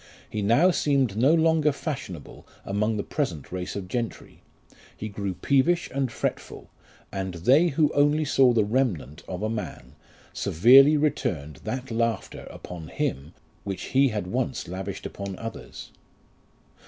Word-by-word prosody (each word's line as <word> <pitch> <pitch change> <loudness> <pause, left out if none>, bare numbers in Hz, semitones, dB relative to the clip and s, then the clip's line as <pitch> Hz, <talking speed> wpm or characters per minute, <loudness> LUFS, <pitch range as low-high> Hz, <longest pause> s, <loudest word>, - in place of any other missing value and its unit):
He 105 - -4
now 120 - +4
seemed 135 - +1
no 130 +7 +4
longer 160 -2 +3
fashionable 130 - -7 0.2
among 105 +2 0
the 100 - -2
present 90 - -3
race 90 0 -4
of 100 -2 -5
gentry; 115 +2 -5 0.6
he 110 - -5
grew 100 -2 -4
peevish 150 - +1
and 135 -3 -1
fretful, - - -4 0.4
and 95 -2 -4
they 135 - +4
who 150 -1 +1
only 145 +2 +3
saw 135 -3 +4
the 110 -3 +2
remnant 105 - -1
of 90 +2 -5
a - - +1
man, 105 - -6 0.4
severely 135 - +6
returned 120 - -1
that 130 -1 -4
laughter 115 0 -2
upon 85 -3 -9
him 70 +1 -3 0.3
which 100 -2 -5
he 135 +1 +5
had 105 -6 -3
once 125 +6 -2
lavished 95 +2 -6
upon 100 -2 -6
others. 115 0 -8
115 Hz, 140 wpm, -26 LUFS, 95-140 Hz, 0.6 s, severely